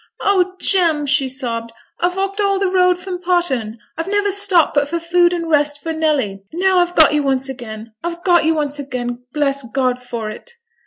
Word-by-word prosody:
'Oh, 375 -2 +1
Jem!' 330 -6 +2
she 280 -1 +2
sobbed, 235 -3 -4 0.3
'I've 360 +2 0
walked 390 +1 -2
all 395 -1 +1
the 385 -1 0
road 365 -1 +3
from 360 -1 -6
Potterne. 315 -12 0 0.2
I've 330 +2 -4
never 410 0 +1
stopped 390 -4 +3
but 285 0 +1
for 340 +2 -2
food 345 +1 +2
and 340 -2 -3
rest 295 -2 +1
for 325 +3 -4
Nelly, 290 -12 -1
and 335 - -7
now 375 -1 +3
I've 350 0 0
got 315 -2 +6
you 300 - +2
once 270 -1 +1
again, 230 -4 -8
I've 340 0 -5
got 350 -3 +4
you 320 +1 +2
once 295 -1 -1
again, 250 -3 -5
bless 280 -1 -1
God 250 +1 -1
for 235 -3 -5
it!' 475 - -12
315 Hz, 205 wpm, -18 LUFS, 265-360 Hz, 0.3 s, got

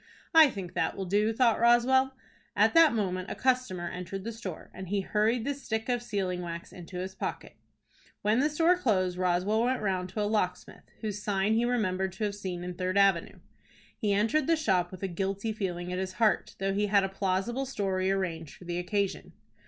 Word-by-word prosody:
"I 320 -3 +8
think 190 -7 -7
that - - -1
will 195 - -3
do," 205 +4 +2
thought 230 -1 +3
Roswell. 260 +3 +4 0.4
At - - +4
that 330 -6 +6
moment 185 -3 -2
a - - -4
customer 250 -9 0
entered 180 +2 -6
the 230 - -4
store, 200 -7 -8
and 190 0 -8
he 200 0 0
hurried 220 +4 +1
the 285 - 0
stick 235 -4 -4
of 245 -1 +1
sealing 195 -6 -2
wax 170 -1 -7
into 180 0 -9
his 185 +1 -4
pocket. - - -5 0.7
When 215 +3 +3
the 295 +3 +3
store 330 +4 +3
closed, 185 - 0
Roswell 185 +4 +1
went 255 +2 +1
round 185 -2 -1
to 210 - -3
a - - +1
locksmith, 185 -4 -2
whose 210 -2 -4
sign 205 0 +1
he 230 +2 +2
remembered 190 -6 0
to 195 - -5
have 205 -1 0
seen 185 -3 -5
in 180 0 -4
Third 185 +2 -2
Avenue. 195 -4 +2 0.5
He 210 -4 -1
entered 225 +11 +2
the 330 - +4
shop 190 - +1
with 185 +1 -10
a - - +1
guilty 195 +4 -2
feeling 180 -4 -3
at 180 - -2
his 185 0 -3
heart, 215 +2 +1
though 195 0 -1
he 205 +1 +1
had 200 -1 +4
a - - +1
plausible 195 +7 -1
story 190 -6 -1
arranged 170 -5 -2
for - - -15
the 175 0 -2
occasion. 200 +2 -2
200 Hz, 205 wpm, -29 LUFS, 185-230 Hz, 0.7 s, I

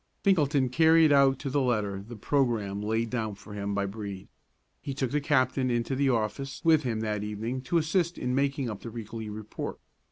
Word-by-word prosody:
Finkelton 145 -8 +3
carried 160 +3 +5
out 135 -2 +5
to 140 - -6
the 140 +1 +1
letter 105 -6 0
the 115 +4 -10
programme 110 -5 0
laid 110 +2 -1
down 110 -4 -2
for 105 +1 -12
him 100 0 -3
by 100 0 0
Brede. 100 -1 -6 0.5
He 140 -2 -5
took 130 -3 -1
the 150 - +1
captain 130 -3 +2
into 120 +2 0
the 140 0 +2
office 130 +4 -1
with 160 -2 +5
him 115 -5 -2
that 105 -2 -2
evening 110 +5 -3
to 135 +7 0
assist 170 +2 +1
in 125 - -2
making 140 0 0
up 105 -3 -5
the 115 - -6
weekly 110 -1 -6
report. 105 0 -6
125 Hz, 195 wpm, -28 LUFS, 105-140 Hz, 0.5 s, carried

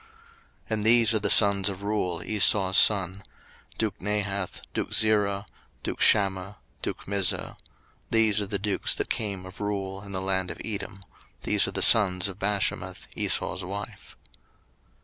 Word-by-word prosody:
01:036:017 450 - -26 0.6
And 110 -1 -2
these 115 0 +4
are 110 - +2
the - - -1
sons 100 -2 +5
of 100 0 -8
Reuel 95 -5 -2
Esau's 100 -2 +4
son; 100 -2 +2 0.6
duke 110 -3 -3
Nahath, 100 -1 -3
duke - - -4
Zerah, 105 -2 +2 0.4
duke - - -5
Shammah, 100 0 +2 0.2
duke - - -5
Mizzah: 100 -2 0 0.5
these 110 -2 +2
are 100 - -3
the 100 0 -1
dukes 100 +1 -1
that - - -4
came 100 -4 -4
of 95 +2 -12
Reuel 95 -2 -4
in 100 0 -11
the 95 - -2
land 95 -1 -1
of - - -7
Edom; 100 -2 -6 0.4
these - - +1
are - - -3
the - - 0
sons 95 -4 +5
of 95 0 -8
Bashemath 100 -1 -2
Esau's 95 +2 -1
wife. 100 +2 -8
100 Hz, 155 wpm, -26 LUFS, 95-105 Hz, 0.6 s, sons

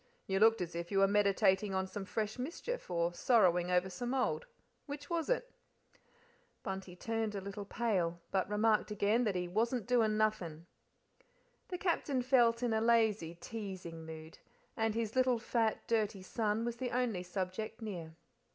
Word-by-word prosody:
"You 195 0 0
looked 225 0 +5
as 175 -1 -3
if 170 +2 -5
you 195 - +1
were 195 0 +6
meditating 200 -1 +3
on 190 0 +1
some 195 +1 -6
fresh 215 +3 -3
mischief, 345 - -4
or 170 0 0
sorrowing 180 -4 +3
over 180 +1 +3
some 240 +8 -3
old 265 - 0 0.4
which 285 +2 -7
was 335 -2 -1
it?" - - 0 1.1
Bunty 190 -3 -5
turned 225 +2 -2
a - - -1
little 200 +1 -6
pale, 185 -7 0
but 190 0 0
remarked 215 +1 +2
again 210 +3 +2
he 180 -2 -2
"wasn't 230 +5 0
doin' 225 -3 +3
nothin'." 180 -7 0 1.0
The 360 - -4
Captain 300 -8 0
felt 240 -2 +4
in 235 -2 +1
a 220 - +2
lazy, 220 -7 +2
teasing 180 -3 -7
mood, 160 0 -9 0.4
and 225 -1 0
his 225 0 -2
little 255 -1 +3
fat, 225 -1 0
dirty 210 -4 0
son, 215 +2 -1
was 240 0 -3
the 250 0 -2
only 240 -7 0
subject 185 +5 -4
near. 175 -8 -6
215 Hz, 160 wpm, -34 LUFS, 185-235 Hz, 1.1 s, were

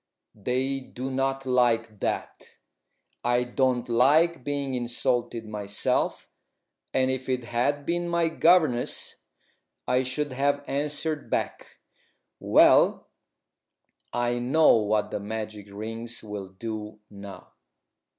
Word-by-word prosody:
They 130 +5 -1
do 130 0 -6
not 135 0 -1
like 115 -4 +1
that. - - -4 0.7
I 120 0 +2
don't 125 0 0
like 140 +6 +3
being 140 -1 -2
insulted 120 -1 -1
myself, 105 -1 -1 0.6
and 130 0 +2
if 130 0 -4
it 125 -1 0
had 130 +5 -1
been 175 +2 -1
my 170 -1 +2
governess 160 -6 +2 0.7
I 125 +1 +3
should 130 +2 -2
have 145 +2 0
answered 150 +2 -2
back. - - -3 0.6
Well, - - +5 1.0
I 120 0 0
know 145 +6 +5
what 105 -1 0
the - - -2
magic 105 0 -6
rings 115 +3 -6
will 105 -2 -6
do 105 +2 -6
now." 100 -1 -11
125 Hz, 110 wpm, -26 LUFS, 115-140 Hz, 1.0 s, Well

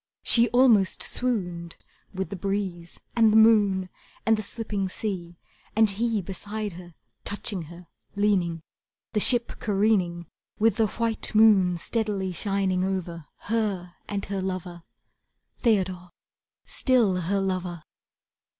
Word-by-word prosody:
She 235 0 +4
almost 240 -6 +4
swooned, 180 -9 -2 0.3
With 190 0 -4
the - - -3
breeze 185 -3 -4 0.2
and 225 -2 +5
the 220 - +5
moon 205 -4 +5 0.4
And 225 - +4
the 215 - -3
slipping 205 -2 -3
sea, 180 -4 -5 0.4
And 220 -1 +4
he 220 0 -1
beside 205 +2 -5
her, 175 -1 -12 0.3
Touching 205 -2 -3
her, 175 +1 -12 0.3
leaning 185 -5 +1 0.5
The 215 - +2
ship 240 +2 +2
careening, 195 -5 +1 0.3
With 220 -1 +2
the 220 -2 +3
white 225 +1 -3
moon 200 -5 +5
steadily 205 -1 -1
shining 190 0 0
over 175 -4 -3
Her 200 -5 -2 0.2
and 200 -1 -3
her 195 -1 -3
lover, 185 -2 -5 0.8
Theodore, 185 -6 +1 0.6
still 235 -8 +2
her 195 +4 0
lover! 185 -3 -3
195 Hz, 125 wpm, -26 LUFS, 180-220 Hz, 0.8 s, and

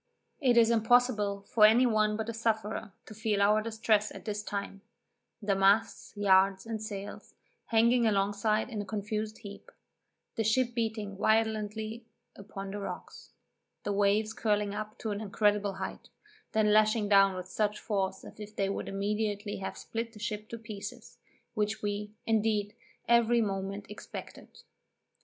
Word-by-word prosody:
It 250 -4 +3
is 230 0 +6
impossible 225 -3 +2
for 215 +2 +2
any 225 +4 +7
one 215 -2 +2
but 220 -1 -3
a 230 - -3
sufferer 220 -1 -2
to - - -10
feel 215 -1 -1
our 210 +2 +4
distress 220 -1 +1
at - - -10
this 210 -1 -3
time; 200 -1 -5 0.6
the 200 -1 +2
masts, 200 +4 +2
yards, 190 -1 +4
and 225 -1 -4
sails 205 -2 -7 0.3
hanging 235 +1 +4
alongside 205 +3 +1
in 215 -3 -3
a - - -6
confused 215 +1 -3
heap; 200 -3 -11 0.7
the 225 - +1
ship 240 +3 +2
beating 220 -4 -3
violently 220 +1 0 0.3
upon 195 -1 -8
the 205 - -5
rocks; 200 - -8 0.5
the 205 - -1
waves 205 +2 +2
curling 210 -2 0
up 215 +1 -6
to 220 - -4
an 205 +1 -3
incredible 205 -1 +1
height, - - -6 0.4
then 220 -1 +3
dashing 215 0 +4
down 195 -1 +5
with 185 0 -6
such 210 +2 -1
force 190 -3 -2
as - - -12
if 210 0 -9
they 195 -2 0
would 195 - -3
immediately 205 +1 -2
have 190 - -5
split 230 0 -5
the 210 - -12
ship 210 0 -4
to 230 - -5
pieces, 210 -3 -9 0.3
which 215 0 -1
we, 205 0 -3
indeed, 215 -2 +1 0.3
every 235 0 +4
moment 195 -1 -2
expected. 210 - -10
210 Hz, 155 wpm, -30 LUFS, 200-220 Hz, 0.7 s, any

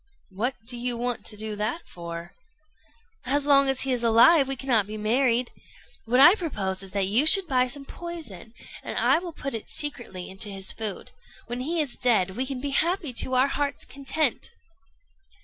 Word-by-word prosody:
"What 235 +8 -2
do 245 +1 -7
you 240 0 -2
want 245 0 -3
to 210 - -5
do 215 0 -2
that 220 +11 -3
for?" 170 0 -8 0.9
"As 280 +2 0
long 275 -1 +4
as 270 -1 +2
he 270 -1 0
is 240 -1 -2
alive, 260 +6 +5
we 270 - -1
cannot 245 -6 0
be 215 +1 -6
married. 240 +3 +1 0.5
What 245 +3 +1
I 340 +7 +9
propose 205 - -3
is 195 - -6
that 200 -1 +1
you 230 +10 +2
should 390 +4 +9
buy 255 -4 +1
some 275 +2 -4
poison, 275 - -9 0.3
and - - -7
I - - +3
will 350 -1 -7
put 275 -3 -6
it 225 - -6
secretly 240 -11 -4
into 190 +3 0
his 195 -1 -1
food. 215 -3 -4 0.3
When 240 +1 -5
he 325 +5 0
is 275 - -9
dead, 215 -7 +2
we 255 +7 -3
can 270 -2 -5
be 280 +2 -4
happy 330 0 0
to 255 +2 +1
our 260 +2 +3
hearts' 285 0 -3
content." 280 +3 -2
250 Hz, 190 wpm, -25 LUFS, 215-280 Hz, 0.9 s, I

